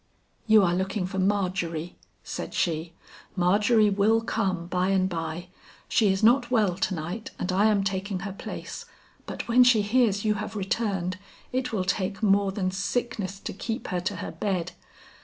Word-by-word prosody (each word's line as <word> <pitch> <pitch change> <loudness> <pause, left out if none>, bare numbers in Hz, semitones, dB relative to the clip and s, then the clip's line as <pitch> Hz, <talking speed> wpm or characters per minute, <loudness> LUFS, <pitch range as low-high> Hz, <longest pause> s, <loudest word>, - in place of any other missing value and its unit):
"You 215 -2 +7
are 175 -2 +2
looking 190 +1 -1
for 190 +1 -4
Margery," 185 -4 -1 0.3
said - - -6
she. 165 0 -1 0.4
"Margery 210 +4 +3
will 210 +3 +3
come 190 -6 -1
by 180 +1 0
and 190 -1 +2
by; 165 0 -4 0.4
she 210 -4 +3
is 190 +2 -1
not 240 +2 +5
well 215 -7 +2
to 190 0 -1
night 175 +7 -5
and 180 - -2
I 195 +3 +3
am 210 -2 +3
taking 195 -1 -2
her 195 0 -5
place, - - -7 0.4
but - - -5
when 245 +2 +6
she 240 -4 +5
hears 210 -2 +2
you 215 - +3
have 215 0 -6
returned, 190 -3 -1 0.3
it 255 0 -1
will 195 -5 -1
take 190 +1 -2
more 200 -1 +3
than 190 -1 -1
sickness 195 -1 -2
to - - -5
keep 225 +5 -4
her 180 - -1
to 185 +3 -3
her 170 - -5
bed. 190 -5 -2
195 Hz, 175 wpm, -26 LUFS, 185-215 Hz, 0.4 s, You